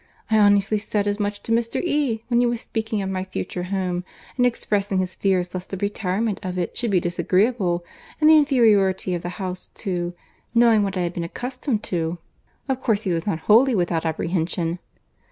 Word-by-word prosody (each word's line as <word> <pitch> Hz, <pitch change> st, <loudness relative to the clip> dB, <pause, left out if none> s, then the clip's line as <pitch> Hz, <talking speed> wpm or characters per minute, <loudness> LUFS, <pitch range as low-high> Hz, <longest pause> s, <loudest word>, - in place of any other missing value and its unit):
I 220 Hz, -, +5 dB
honestly 205 Hz, 0 st, +4 dB
said 205 Hz, 0 st, -1 dB
as 205 Hz, +1 st, -1 dB
much 205 Hz, 0 st, -2 dB
to -, -, -5 dB
Mr. 230 Hz, 0 st, +1 dB
E. 285 Hz, -10 st, 0 dB
when 240 Hz, -1 st, +2 dB
he 245 Hz, -, +3 dB
was 235 Hz, -1 st, -2 dB
speaking 220 Hz, -2 st, -3 dB
of 190 Hz, -, -3 dB
my 185 Hz, -1 st, -2 dB
future 185 Hz, -1 st, -4 dB
home, 180 Hz, -2 st, -2 dB, 0.3 s
and 250 Hz, -1 st, +4 dB
expressing 205 Hz, -4 st, -1 dB
his 185 Hz, 0 st, -1 dB
fears 185 Hz, -2 st, 0 dB
lest 185 Hz, 0 st, -6 dB
the 195 Hz, -, -4 dB
retirement 200 Hz, +1 st, -1 dB
of 185 Hz, -3 st, -4 dB
it 175 Hz, -2 st, -2 dB
should 235 Hz, -, -2 dB
be 190 Hz, -3 st, +3 dB
disagreeable; 180 Hz, +1 st, +1 dB, 0.3 s
and 305 Hz, -, +4 dB
the 315 Hz, -, +8 dB
inferiority 210 Hz, -10 st, +3 dB
of 175 Hz, -, -2 dB
the 175 Hz, -, -4 dB
house 185 Hz, -2 st, -4 dB
too—knowing 210 Hz, +5 st, 0 dB
what 195 Hz, -1 st, -1 dB
I -, -, 0 dB
had 175 Hz, 0 st, -2 dB
been 170 Hz, -, -3 dB
accustomed 250 Hz, -, -3 dB
to—of 175 Hz, -, -5 dB
course 220 Hz, -3 st, +1 dB
he 185 Hz, -, 0 dB
was 165 Hz, +2 st, -2 dB
not 165 Hz, -5 st, -1 dB
wholly 235 Hz, +6 st, +5 dB
without 175 Hz, -3 st, 0 dB
apprehension. 165 Hz, +1 st, -1 dB
200 Hz, 190 wpm, -23 LUFS, 180-225 Hz, 0.3 s, the